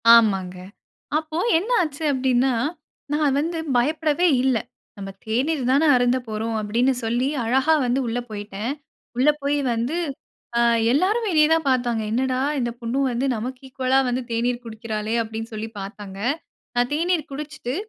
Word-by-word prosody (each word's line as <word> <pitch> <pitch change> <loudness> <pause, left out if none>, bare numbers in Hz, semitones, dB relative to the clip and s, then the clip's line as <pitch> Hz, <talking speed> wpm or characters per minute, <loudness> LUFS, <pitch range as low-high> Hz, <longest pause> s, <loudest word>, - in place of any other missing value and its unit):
ஆமாங்க. 195 -5 +3 0.6
அப்போ 315 0 -4 0.2
என்ன 390 +8 -3
ஆச்சு 305 -2 -3
அப்டின்னா, 260 0 +2 0.6
நான் 295 -2 +2
வந்து 330 +3 -1 0.2
பயப்படவே 310 +6 +2 0.2
இல்ல. 260 -3 +3 0.4
"நம்ம 195 -1 -6 0.2
தேநீர் 260 +6 0
தானே 290 +4 +4
அருந்த 245 0 +3
போறோம்." 220 +1 -3
அப்டின்னு 235 +5 +2
சொல்லி, 240 +3 0 0.2
அழகா 265 +7 +3
வந்து 245 +2 +1
உள்ள 230 +1 -1
போயிட்டேன். 210 +3 -4 0.4
உள்ள 265 +4 +4
போய் 285 +1 +1 0.2
வந்து, 240 +8 -1 0.6
ஆ - - +4 0.3
எல்லாரும் 410 - +2
வெளியே 305 -4 +5
தான் 325 -3 +1
பார்த்தாங்க, 245 -3 +1
"என்னடா 255 +2 0 0.2
இந்த 240 -2 -1
பொண்ணு 235 +3 -1
வந்து, 245 +3 0
நமக்கு 250 +3 -5
ஈக்குவலா 260 0 +2
வந்து 250 +1 -1
தேநீர் 240 +1 -1
குடிக்கிறாளே!" 220 -1 -3
அப்டின்னு 225 +1 -6
சொல்லி 215 +1 -4
பார்த்தாங்க. 195 0 -8 0.6
நான் 245 0 +2
தேநீர் 330 0 0
குடிச்சுட்டு, 280 -3 -5
250 Hz, 145 wpm, -23 LUFS, 225-290 Hz, 0.6 s, வெளியே